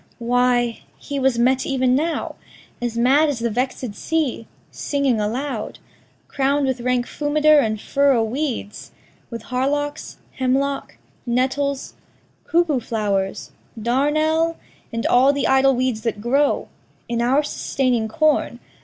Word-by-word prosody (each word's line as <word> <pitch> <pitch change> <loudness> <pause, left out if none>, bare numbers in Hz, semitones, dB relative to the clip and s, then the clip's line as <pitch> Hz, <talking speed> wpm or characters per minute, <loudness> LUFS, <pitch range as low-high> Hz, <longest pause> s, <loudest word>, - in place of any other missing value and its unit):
Why, 245 0 +1 0.2
he 285 -1 -5
was 265 -2 +2
met 255 +2 +2
even 260 -2 +1
now 320 +5 -1 0.5
As 240 -1 -3
mad 275 +6 +4
as 285 - -2
the 235 0 -2
vex'd 250 -1 -2
sea, 295 -4 -2 0.2
singing 275 -6 0
aloud, 235 +2 -3 0.5
Crown'd 280 +1 +1
with 260 -2 -1
rank 250 0 0
fumiter 300 +1 +3
and 215 -5 0
furrow 275 -1 +2
weeds, 240 -3 -4 0.4
With 230 -2 -7
hardocks, 290 +3 -2 0.2
hemlock, 270 +2 -1 0.3
nettles, 265 +3 -1 0.5
cuckoo 330 -5 +2
flow'rs, 205 -4 -2 0.3
Darnel, 310 +7 +1 0.4
and 230 -1 -3
all 260 +3 +5
the 285 0 -1
idle 265 0 +4
weeds 250 -3 -1
that 220 -2 -2
grow 275 +6 +1 0.4
In 235 0 -1
our 265 +5 +2
sustaining 255 -5 -1
corn. 305 +7 +1
260 Hz, 125 wpm, -21 LUFS, 235-285 Hz, 0.5 s, all